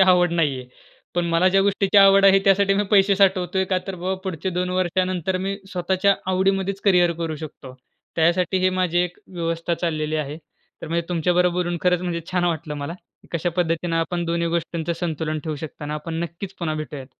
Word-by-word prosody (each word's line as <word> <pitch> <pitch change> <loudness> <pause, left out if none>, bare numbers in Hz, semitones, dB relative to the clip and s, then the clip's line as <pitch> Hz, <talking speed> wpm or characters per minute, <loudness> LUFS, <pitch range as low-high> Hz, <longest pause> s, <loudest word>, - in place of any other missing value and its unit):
आवड 180 -2 +5
नाही 155 -5 +1
आहे. 125 - -13 0.5
पण 175 0 +1
मला 170 +2 +3
ज्या 195 +1 +3
गोष्टीची 200 0 +1
आवड 195 0 +7
आहे 195 0 +7
त्यासाठी 195 0 +4
मी 205 - +2
पैसे 200 -1 +5
साठवतोय, 190 -1 +2
का 185 0 0
तर 195 - -4
बा 185 +2 -2
पुढच्या 190 0 -3
2 180 +1 -1
वर्षानंतर 185 0 0
मी 195 +2 -2 0.2
स्वतःच्या 190 +2 +2 0.2
आवडीमध्येच 195 +1 0
करिअर 180 -4 +4
करू 165 -2 -3
शकतो. 140 -4 -9 0.4
त्यासाठी 175 +3 +2
हे 185 0 +2
माझी 175 -1 +1
एक 180 0 -1
व्यवस्था 165 0 -2
चाललेली 155 -2 -2
आहे. 150 0 -3 0.5
तर - - -6
म्हणजे 170 +1 -1
तुमच्याबरोबर 180 +1 +1
खरंच 180 -1 +2
म्हणजे 175 -2 -2
छान 180 -1 +1
वाटलं 160 -3 -2
मला, 145 +3 -5 0.4
कशा 170 +1 -1
पद्धतीनं 165 -1 0
आपण 170 +1 -1
दोन्ही 170 0 -1
गोष्टींचं 170 0 -2
संतुलन 160 -2 -2
ठेवू 155 -2 -3
शकता 145 0 -8
ना! 150 - -3
आपण 155 +2 -5
नक्कीच 170 +4 -6
पुन्हा 160 -3 -2
भेटूयात. 150 -3 -6
175 Hz, 185 wpm, -22 LUFS, 165-185 Hz, 0.5 s, आवड